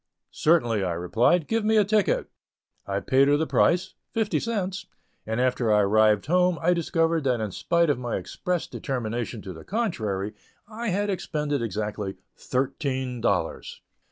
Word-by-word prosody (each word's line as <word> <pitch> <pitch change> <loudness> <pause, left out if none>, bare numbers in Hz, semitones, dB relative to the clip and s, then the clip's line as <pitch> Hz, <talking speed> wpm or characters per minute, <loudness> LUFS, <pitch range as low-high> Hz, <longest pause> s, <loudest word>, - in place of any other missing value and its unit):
"Certainly," 120 - +2
I 90 -2 -1
replied; 115 - +2
"give 225 -1 0
me 220 +1 +3
a 210 - +5
ticket." 210 -1 +1 0.6
I 100 0 -1
paid 135 +1 +3
her 145 +1 +4
the 160 - 0
price 180 +3 +2 0.2
(fifty 220 -2 +1
cents), 205 -3 -3 0.4
and 110 +1 -1
after 125 -3 +1
I 105 0 +5
arrived 105 0 +3
home, 180 +3 +3
I 175 +2 +3
discovered 165 -1 +1
that 125 -3 +2
in 110 -2 -3
spite 170 - +2
of 140 - -2
my 120 -2 -3
expressed 180 -3 -3
determination 120 -3 -3
to 95 - -7
the 80 - -11
contrary, 110 - -2 0.3
I 230 +2 -5
had 205 +1 0
expended 150 -6 -2
exactly 105 -3 -3 0.2
"thirteen" 130 -1 -2
dollars! 120 - -1
140 Hz, 155 wpm, -25 LUFS, 110-180 Hz, 0.6 s, a